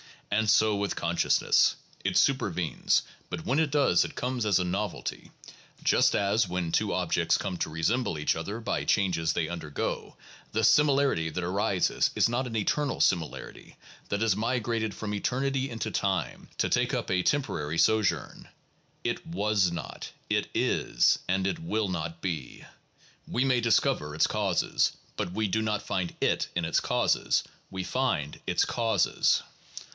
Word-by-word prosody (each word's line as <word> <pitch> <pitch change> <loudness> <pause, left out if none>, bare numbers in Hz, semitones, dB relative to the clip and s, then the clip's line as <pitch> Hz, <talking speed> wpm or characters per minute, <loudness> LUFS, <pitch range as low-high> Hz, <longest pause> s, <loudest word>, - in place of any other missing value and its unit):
And 110 +1 +2
so 105 0 +4
with 100 0 -2
consciousness. 85 0 +2 0.3
It - - +1
supervenes, - - +1 0.3
but - - -5
when 135 +5 +1
it 160 -2 +2
does 140 - +3
it - - -7
comes 125 -2 -2
as 100 -3 +3
a 90 - +1
novelty, 95 +3 -4 0.5
just - - +4
as, 100 +1 +2
when 90 -2 -2
two 105 +4 +1
objects 85 -2 +1
come 95 -3 -4
to - - -2
resemble 85 +5 0
each 75 - +1
other 100 +7 -4
by 115 - -2
changes 90 -5 +1
they 80 -2 -1
undergo, 80 -3 -4 0.4
the - - +1
similarity 140 - +3
that 90 +2 -4
arises 95 +1 +1
is - - +4
not 125 +2 -1
an 115 - -6
eternal 140 +7 0
similarity 85 -4 -1 0.3
that 100 - -1
has 110 -4 +3
migrated 115 -1 -1
from 105 -1 -4
eternity 135 +5 -1
into 115 -2 -4
time 95 -3 -2
to - - +1
take - - +1
up - - -3
a 90 -1 +2
temporary 85 - -1
sojourn; 110 +5 +1 0.6
it - - -3
was 100 +1 +1
not; 85 - -6 0.2
it - - +1
is; - - +2
and 95 +1 +1
it 160 - -1
will 110 - -1
not 85 -2 -4
be. 80 -9 -5 0.6
We 125 - 0
may 130 -2 +2
discover 75 -9 +1
its 80 - +4
causes, 100 -4 +1 0.2
but 90 - -3
we 110 +1 0
do 110 +3 0
not 105 -1 -1
find 90 -3 -2
it - - +1
in 85 -1 0
its 80 - +2
causes; - - +1 0.3
we 95 -1 -4
find 110 - -1
its - - +2
causes. 115 -5 +1
100 Hz, 160 wpm, -28 LUFS, 85-115 Hz, 0.6 s, so